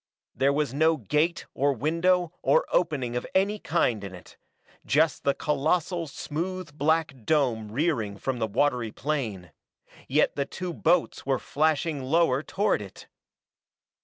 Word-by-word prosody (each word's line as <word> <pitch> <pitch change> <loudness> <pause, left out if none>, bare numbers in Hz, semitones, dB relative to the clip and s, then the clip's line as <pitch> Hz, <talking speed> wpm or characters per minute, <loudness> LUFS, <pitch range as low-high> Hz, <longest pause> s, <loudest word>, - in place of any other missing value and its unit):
There 135 +3 +2
was 145 -2 -1
no 160 +3 +3
gate 155 +4 0
or 140 +1 +2
window 170 +6 +1
or - - +3
opening 140 -9 0
of 125 - -3
any 200 +3 +2
kind 125 - 0
in 95 -2 -7
it. 90 - -14 0.5
Just 155 +2 +2
the 140 - +2
colossal, 165 +3 0
smooth 165 +2 -5
black 155 +1 +1
dome 120 -7 +1
rearing 115 -7 -1
from 130 +1 -3
the 110 - 0
watery 120 0 0
plain. 110 - -3 0.6
Yet - - +2
the 140 - -1
two 180 +3 -5
boats 165 +1 +1
were 135 -1 +2
flashing 155 +1 0
lower 140 -1 +2
toward 200 - 0
it. 100 -2 -11
150 Hz, 140 wpm, -27 LUFS, 130-165 Hz, 0.6 s, no